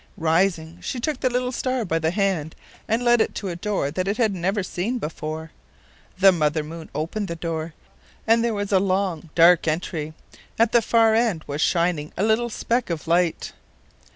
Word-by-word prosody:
Rising, 165 Hz, 0 st, 0 dB
she 255 Hz, -, -4 dB
took 300 Hz, +5 st, -2 dB
the 255 Hz, -, +1 dB
little 250 Hz, 0 st, -1 dB
star 255 Hz, -2 st, -1 dB
by 165 Hz, -1 st, 0 dB
the 160 Hz, 0 st, +1 dB
hand 180 Hz, -4 st, -1 dB, 0.3 s
and 230 Hz, +2 st, 0 dB
led 240 Hz, -1 st, +5 dB
it -, -, -1 dB
to 195 Hz, -, -4 dB
a 175 Hz, -, -4 dB
door 175 Hz, -5 st, -2 dB
that 185 Hz, +4 st, -2 dB
it 200 Hz, -, -1 dB
had 225 Hz, -5 st, +2 dB
never 190 Hz, +3 st, -1 dB
seen 195 Hz, +7 st, -2 dB
before. 155 Hz, -3 st, -5 dB, 0.7 s
The 195 Hz, +1 st, +7 dB
Mother 155 Hz, -3 st, 0 dB
Moon 160 Hz, +1 st, -9 dB
opened 185 Hz, +7 st, -3 dB
the 170 Hz, -, -4 dB
door, 165 Hz, -1 st, -4 dB, 0.5 s
and 230 Hz, +1 st, +4 dB
there 235 Hz, -2 st, 0 dB
was 205 Hz, 0 st, -3 dB
a 190 Hz, -, +5 dB
long 185 Hz, -4 st, -1 dB
dark 170 Hz, 0 st, +6 dB
entry; 155 Hz, -1 st, -2 dB, 0.4 s
at 230 Hz, 0 st, +3 dB
the 235 Hz, -, +5 dB
far 225 Hz, 0 st, +3 dB
end 220 Hz, -8 st, +1 dB
was 145 Hz, +1 st, -4 dB
shining 170 Hz, -4 st, +1 dB
a 195 Hz, -, 0 dB
little 220 Hz, +2 st, +2 dB
speck 235 Hz, +1 st, -1 dB
of 165 Hz, -2 st, -4 dB
light. 170 Hz, 0 st, +1 dB
185 Hz, 190 wpm, -23 LUFS, 160-220 Hz, 0.7 s, The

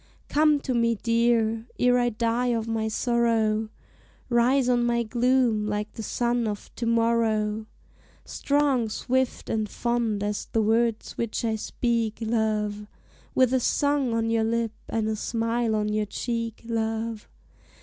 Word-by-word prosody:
Come 300 Hz, 0 st, +4 dB
to 260 Hz, -, -2 dB
me, 230 Hz, -1 st, +2 dB
dear, 230 Hz, 0 st, +1 dB
ere 250 Hz, 0 st, +3 dB
I 245 Hz, 0 st, +2 dB
die 235 Hz, +2 st, 0 dB
of 230 Hz, -2 st, 0 dB
my 225 Hz, -1 st, -1 dB
sorrow, 225 Hz, -1 st, +1 dB, 0.6 s
Rise 250 Hz, +2 st, +3 dB
on 245 Hz, -1 st, +3 dB
my 235 Hz, 0 st, +1 dB
gloom 240 Hz, -2 st, +2 dB
like 210 Hz, 0 st, -2 dB
the -, -, -8 dB
sun 240 Hz, +2 st, 0 dB
of 205 Hz, -1 st, -6 dB
to 235 Hz, -, -2 dB
morrow; 225 Hz, -2 st, +1 dB, 0.6 s
Strong, 280 Hz, -5 st, +1 dB
swift, 260 Hz, +3 st, -1 dB
and 215 Hz, -1 st, -1 dB
fond 235 Hz, -4 st, -1 dB
as 205 Hz, 0 st, -2 dB
the 225 Hz, -, +3 dB
words 225 Hz, +1 st, 0 dB
which 230 Hz, 0 st, -2 dB
I 220 Hz, -1 st, +1 dB
speak, 230 Hz, 0 st, -1 dB
love, 215 Hz, -2 st, -1 dB, 0.5 s
With 255 Hz, -1 st, +4 dB
a 260 Hz, -, +4 dB
song 280 Hz, -1 st, +1 dB
on 225 Hz, 0 st, 0 dB
your 225 Hz, -1 st, +2 dB
lip 230 Hz, 0 st, 0 dB, 0.2 s
and 220 Hz, -1 st, -1 dB
a 220 Hz, -, 0 dB
smile 230 Hz, +1 st, -1 dB
on 210 Hz, 0 st, 0 dB
your 210 Hz, 0 st, 0 dB
cheek, 230 Hz, +1 st, -4 dB
love. 225 Hz, -1 st, -3 dB
230 Hz, 150 wpm, -26 LUFS, 220-240 Hz, 0.6 s, Come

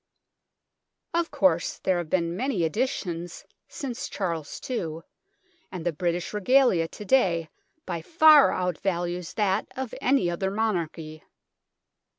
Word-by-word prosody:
Of 340 Hz, 0 st, 0 dB
course, 175 Hz, -4 st, +1 dB
there 185 Hz, -2 st, 0 dB
have 170 Hz, -3 st, -5 dB
been 170 Hz, -1 st, 0 dB
many 245 Hz, -4 st, -1 dB
additions 175 Hz, -, -3 dB, 0.2 s
since 265 Hz, -7 st, -5 dB
Charles 165 Hz, -6 st, -4 dB
II, 165 Hz, -10 st, -3 dB, 0.7 s
and 180 Hz, -3 st, -6 dB
the 175 Hz, -, 0 dB
British 175 Hz, +3 st, -2 dB
Regalia 210 Hz, -5 st, +3 dB
to 210 Hz, -, -10 dB
day 175 Hz, -10 st, +2 dB, 0.4 s
by 170 Hz, -2 st, -4 dB
far 310 Hz, -, +6 dB
out 180 Hz, -3 st, -2 dB
values 175 Hz, -2 st, -2 dB
that 205 Hz, -1 st, +1 dB
of 260 Hz, -3 st, -5 dB
any 265 Hz, -7 st, +3 dB
other 175 Hz, +3 st, -1 dB
monarchy. 170 Hz, -7 st, -2 dB
180 Hz, 125 wpm, -26 LUFS, 170-230 Hz, 0.7 s, far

